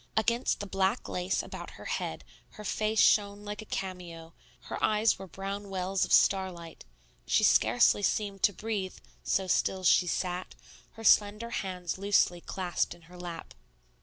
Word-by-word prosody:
Against 235 +3 +1
the - - -4
black 195 +3 0
lace 180 +1 -1
about - - -8
her - - -11
head - - -3 0.3
her 210 - -10
face 215 +2 0
shone 205 0 +3
like 210 +1 -5
a - - -10
cameo, 175 -5 -6 0.3
her - - -6
eyes 215 +1 +3
were 195 - -8
brown 195 +2 -6
wells 190 0 -1
of - - -10
starlight; 185 -4 +2 0.4
she - - +3
scarcely 120 - +4
seemed 200 -1 -1
to - - +5
breathe, 205 -2 -4 0.3
so 195 - +1
still 185 +1 0
she 180 0 +5
sat, 180 +1 -3 0.4
her 225 - -11
slender 210 +2 +4
hands 180 -2 -4
loosely 195 -3 +2
clasped 180 -1 -2
in 170 - -20
her 180 +2 -14
lap. 175 -2 -7
195 Hz, 160 wpm, -29 LUFS, 180-205 Hz, 0.4 s, to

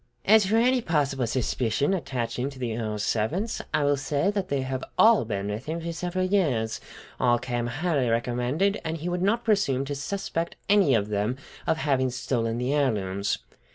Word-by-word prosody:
"As 215 -1 +6
for 215 - +2
any 250 +2 +3
possible 140 - 0
suspicion 125 - 0
attaching 125 -6 -2
to 135 - -12
the 120 -3 -3
Earl's 110 -2 -3
servants, 135 - -1
I 150 - +1
will 145 0 +2
say 145 +6 0
that 200 -2 -2
they 140 -2 -1
have 130 -1 -3
all 220 - +6
been 100 -2 -3
with 105 +6 -5
him 165 +2 -2
for 170 0 -4
several 180 +3 -2
years, 140 - +1 0.4
all 120 -1 +4
came 120 -1 -2
highly 145 -1 0
recommended, 125 - 0
and 165 0 -3
he 165 +3 -4
would 175 0 -2
not 225 +5 +1
presume 195 - +2
to 145 - -3
suspect 165 +3 -3
any 195 - +5
of 105 -1 0
them 105 +4 -1 0.3
of 160 - +2
having 135 -4 +1
stolen 120 -2 -1
the 125 +3 -1
heirlooms." 100 -8 0
135 Hz, 185 wpm, -26 LUFS, 120-180 Hz, 0.4 s, As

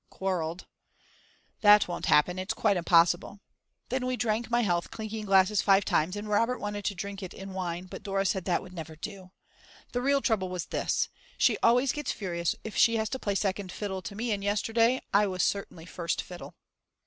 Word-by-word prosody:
_ - - -42
quarrelled. 180 -3 -3 0.9
That 210 -1 +6
won't 175 - -4
happen, 180 +5 +3
it's 185 +1 -3
quite 210 -3 +2
impossible! 175 +2 +3 0.5
Then 255 0 -1
we 255 0 -1
drank 225 0 -1
my 240 0 +2
health 175 -6 0
clinking 220 -1 -6
glasses 195 0 +4
five 195 0 +4
times 165 +5 +1
and 205 +1 -5
Robert 230 +4 +1
wanted 205 -1 -5
to 205 - -1
drink 200 +2 -6
it 185 - -7
in 195 0 -8
wine 180 -1 -3
but 185 - -9
Dora 195 -1 -1
said 190 -1 0
that 180 - 0
would 185 - -12
never 160 -2 -7
do! 185 +3 -8 0.6
The 245 - -1
real 275 +1 +2
trouble 200 -6 +1
was 180 -1 -4
this. - - -1 0.3
She - - +4
always 250 +2 +4
gets 295 0 -3
furious 170 -4 -2
if 220 - -7
she 230 - +5
has 220 -1 -1
to 260 - -4
play 200 -4 -2
second 195 -1 -1
fiddle 190 -2 -4
to 200 - -7
me 230 +2 -2
and 200 -1 -1
yesterday 225 +4 +2
I 205 +1 +5
was 185 -1 -1
certainly 190 -4 -2
first 170 -1 -3
fiddle. 180 -1 -10
200 Hz, 200 wpm, -28 LUFS, 180-220 Hz, 0.9 s, That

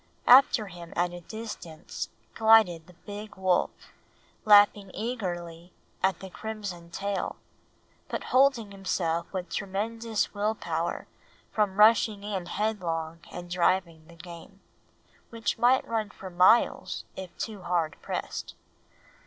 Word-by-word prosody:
After 250 -3 +7
him 175 -3 -10
at 175 0 0
a 175 - -7
distance 180 -6 -7 0.2
glided 220 -7 +4
the 180 - -17
big 205 0 -8
wolf, 185 -1 +2 0.8
lapping 205 -1 +6
eagerly 175 -7 -5 0.3
at 190 -2 +1
the 190 -1 -8
crimson 200 -6 -6
trail, 200 +3 -3 0.7
but - - -4
holding 255 -5 +4
himself 170 -4 -2
with 185 -2 -5
tremendous 220 +3 -2
will 210 +1 0
power - - -3 0.5
from 205 -3 0
rushing 215 -1 +5
in 195 -4 -4
headlong 170 -6 -2
and 175 0 -7
driving 170 -2 0
the 170 - -15
game, 170 +3 -12 0.7
which 230 0 -2
might 250 +3 +4
run 220 -2 -1
for 190 -2 -10
miles 185 +7 +3
if 185 -2 -9
too 210 -3 -5
hard 175 -3 -1
pressed. - - -5
195 Hz, 120 wpm, -28 LUFS, 175-220 Hz, 0.8 s, After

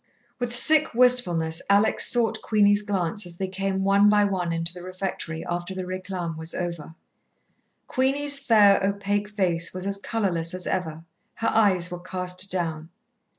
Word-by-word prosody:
With 245 -1 -3
sick 305 +3 +4
wistfulness 180 -11 +2
Alex 200 +2 +4
sought 230 -3 0
Queenie's 205 -1 +3
glance 205 -1 -2
as 170 -1 -11
they 190 - -3
came 190 0 -3
one 200 +1 +4
by 210 0 +3
one 185 -4 -2
into 165 +1 -1
the 180 - -10
refectory, 185 -3 -6
after 175 +2 -5
the 185 - -4
réclame 185 -2 -5
was 160 +1 -5
over. 170 -3 -6 0.9
Queenie's 280 +2 0
fair, 210 -7 +4
opaque 200 +1 -2
face 180 -5 0
was 185 0 -4
as 200 0 -2
colourless 185 -7 -2
as 185 - -3
ever, 165 -4 -4 0.3
her 225 - -1
eyes 190 -5 +2
were 175 - -6
cast 180 +1 -3
down. 165 -3 -4
190 Hz, 155 wpm, -24 LUFS, 175-210 Hz, 0.9 s, sick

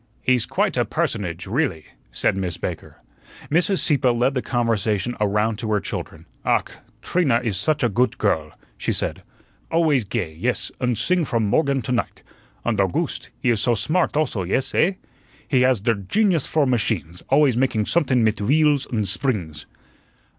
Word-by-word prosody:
"He's 125 -3 +2
quite - - 0
a - - +3
personage 90 -4 -2
really," 105 - -1 0.3
said - - 0
Miss 90 -4 -3
Baker. - - -6 0.5
Mrs. 180 +4 +2
Sieppe 135 -5 +2
led 120 +3 +2
the 130 - -1
conversation 115 -2 0
around 105 +1 +1
to 110 -3 -3
her 105 - +2
children. - - -6 0.2
"Ach, - - +1 0.3
Trina 145 -10 +2
is 110 -5 -1
sudge 145 +9 0
a - - +5
goote 120 +2 +1
girl," 80 -7 0 0.3
she - - -1
said; - - -3 0.5
"always 160 -6 +2
gay, 95 -6 -3
yes, 120 +11 -2
und 125 -2 +1
sing 175 - +2
from 115 -6 0
morgen 135 +4 +1
to 115 - -4
night. 120 -2 -2 0.4
Und 115 -4 0
Owgooste, 95 -3 -1
he 120 - +2
is 110 -3 +1
soh 120 +2 +2
smart 160 - 0
also, 140 -10 0
yes, 95 +9 -1
eh? 190 - +3 0.5
He 130 -4 +2
has 125 -4 +3
der 115 +2 +2
genius 165 - +1
for 155 -2 +2
machines, 100 - -1
always 140 -2 +4
making 120 -4 +1
somethun 130 -6 +2
mit 110 -1 +1
wheels 145 +4 +3
und 110 -3 -1
sbrings." 95 - -2
120 Hz, 170 wpm, -22 LUFS, 105-140 Hz, 0.5 s, a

